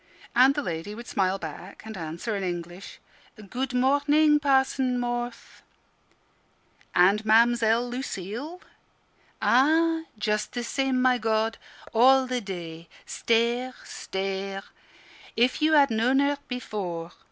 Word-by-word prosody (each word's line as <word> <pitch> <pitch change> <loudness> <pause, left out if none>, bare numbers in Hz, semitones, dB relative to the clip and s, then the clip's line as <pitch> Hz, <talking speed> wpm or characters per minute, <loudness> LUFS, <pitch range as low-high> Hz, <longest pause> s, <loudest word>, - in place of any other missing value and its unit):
And 260 +3 +5
the 290 - -2
lady 170 +3 -5
would 235 +2 -9
smile 190 -3 0
back 175 +3 -9
and 220 0 -8
answer 170 +6 -4
in 200 - -3
English. 175 0 -6 0.5
"Good 260 +1 -2
morning, 290 +4 +3
Parson 265 -2 +1
Morth." 240 -1 -5 1.3
"And 195 +4 +4
Mamzelle 230 +1 +3
Lucille?" 245 - -6 0.8
"Ah, 320 +5 +3
just 210 0 -2
the 245 - -3
same, 265 +1 -1
my 255 -1 +3
God! 220 0 0 0.3
All 260 +3 +5
the 250 -1 -2
day 170 -4 -8 0.2
stare 235 +2 0
stare. 195 0 -5 0.7
If 245 +6 +1
you 315 +1 +3
had 285 -4 +5
known 235 +4 +2
her 280 +1 +1
before! 185 -9 -5
235 Hz, 120 wpm, -26 LUFS, 195-265 Hz, 1.3 s, And